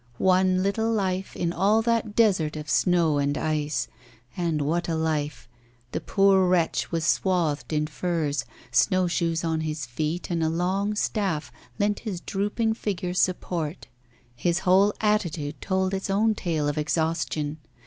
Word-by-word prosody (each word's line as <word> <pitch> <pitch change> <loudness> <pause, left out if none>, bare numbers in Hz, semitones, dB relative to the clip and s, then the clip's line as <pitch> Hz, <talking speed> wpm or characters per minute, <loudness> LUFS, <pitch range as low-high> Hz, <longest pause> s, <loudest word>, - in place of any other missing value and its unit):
One 185 0 +3
little 220 +3 0
life 190 -3 -1
in 170 -1 -1
all 205 +6 +3
that 230 -2 0
desert 185 -9 +3
of 155 0 -6
snow 165 -3 +3
and 145 +1 0
ice. 155 -1 -1 0.5
And 170 -3 0
what 170 +4 -1
a 165 - 0
life. 155 -2 -2 0.4
The - - -3
poor 195 -1 +4
wretch 175 -2 +1
was 165 -1 -1
swathed 170 -5 +1
in 150 -1 +1
furs; 150 -3 -1 0.3
snow 185 +9 +3
shoes 170 -1 0
on 160 -1 0
his 155 -2 -3
feet, 155 +9 -3
and 170 -1 0
a 160 - +2
long 190 +5 0
staff 195 -7 -1 0.3
lent 205 0 +1
his 205 -6 -4
drooping 210 +5 -1
figure 190 -5 -3
support. 175 -3 -1 0.5
His 175 +8 0
whole 190 +3 +5
attitude 170 -8 0
told 190 0 0
its 195 0 -3
own 215 +3 +3
tale 160 -7 -1
of 145 +1 -1
exhaustion. 155 -1 -1
175 Hz, 150 wpm, -25 LUFS, 155-195 Hz, 0.5 s, whole